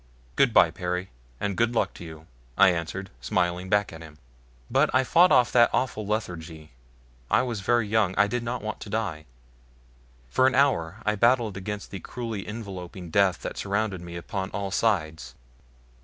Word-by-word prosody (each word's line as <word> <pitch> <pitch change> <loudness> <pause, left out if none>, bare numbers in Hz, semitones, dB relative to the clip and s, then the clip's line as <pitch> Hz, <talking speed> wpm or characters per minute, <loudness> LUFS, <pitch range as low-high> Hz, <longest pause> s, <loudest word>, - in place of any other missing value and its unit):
"Good 135 -3 +4
bye, 85 -6 +5
Perry, 90 +1 -4 0.3
and 100 -2 -2
good 115 +2 +1
luck - - +1
to - - -11
you," 80 -1 -10 0.3
I - - +7
answered, 90 +2 -3
smiling 90 +6 -1
back 105 -2 +1
at 80 - -10
him. 80 -2 -12 0.5
But - - +2
I 130 - +4
fought 175 +7 +5
off 125 -1 +5
that 120 -1 +5
awful 110 -5 -1
lethargy. 80 -7 -4 0.6
I - - +3
was 120 -4 -3
very 115 +3 +1
young 105 -3 +1
I 105 - +5
did 120 +4 -2
not 120 0 -4
want 110 0 -4
to - - -9
die. 100 -8 -3 1.0
For 130 - +3
an 130 - +1
hour 110 -9 +1
I 105 - +2
battled 115 -1 +2
against 105 +2 -6
the 95 - -6
cruelly 115 0 -6
enveloping 95 -5 -7
death 100 -1 +2
that - - -5
surrounded 100 -2 -1
me 85 0 -9
upon 95 +2 -4
all 100 -2 -4
sides. 85 -8 -1
100 Hz, 175 wpm, -26 LUFS, 90-115 Hz, 1.0 s, I